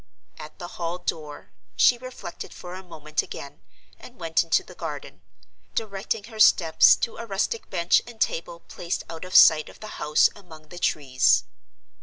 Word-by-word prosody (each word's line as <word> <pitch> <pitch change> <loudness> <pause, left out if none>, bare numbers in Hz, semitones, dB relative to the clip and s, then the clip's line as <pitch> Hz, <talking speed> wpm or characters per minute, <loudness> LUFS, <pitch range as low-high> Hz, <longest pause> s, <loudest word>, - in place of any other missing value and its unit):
At 155 - -10
the 175 - -7
hall 170 +1 -2
door 155 -4 -6 0.2
she 245 - +4
reflected 255 -8 -9
for 180 0 -9
a 185 - -7
moment 155 -4 -3
again, 140 - -10 0.4
and 250 - -14
went 165 -1 +1
into 165 - +1
the - - -14
garden; - - -7 0.5
directing 210 0 -3
her 220 0 -11
steps 165 -6 +6
to 230 - -4
a 235 - -7
rustic 205 +3 -2
bench 170 -2 +2
and 235 -2 -12
table 170 -3 -2
placed 175 0 -5
out 165 +2 -7
of 185 - -7
sight 155 -1 +7
of - - -16
the 215 - -9
house 150 0 +4
among 160 -6 -15
the 175 - -9
trees. 135 -6 +2
175 Hz, 170 wpm, -25 LUFS, 160-205 Hz, 0.5 s, sight